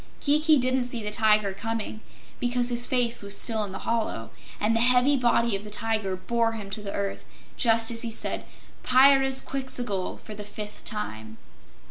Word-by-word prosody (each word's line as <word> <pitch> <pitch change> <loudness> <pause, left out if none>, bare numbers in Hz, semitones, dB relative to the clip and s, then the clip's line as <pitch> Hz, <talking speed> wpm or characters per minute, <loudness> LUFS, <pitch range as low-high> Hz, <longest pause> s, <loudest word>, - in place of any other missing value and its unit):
Kiki 305 +1 +4
didn't 255 0 +1
see 240 -2 -2
the 210 - -1
Tiger 210 -2 +3
coming 225 +1 -4 0.4
because 245 0 0
his 240 0 0
face 245 -2 +1
was 200 0 -2
still 220 -2 -1
in 200 - -6
the 190 - -6
hollow, 220 - -2 0.3
and 220 +2 +1
the - - +2
heavy 250 +3 +5
body 235 -3 +2
of 195 - -5
the 210 - -9
tiger 215 -2 -1
bore 225 +5 0
him 205 -3 -7
to 210 - -1
the 200 -1 -5
earth 200 -1 -3 0.3
just 225 -1 +2
as 230 0 -2
he 235 - -2
said 225 - -3 0.4
"Pyrzqxgl!" 265 -5 +2
for 215 - -9
the 210 0 -7
fifth 210 0 -8
time. 110 - -6
225 Hz, 175 wpm, -26 LUFS, 210-245 Hz, 0.4 s, heavy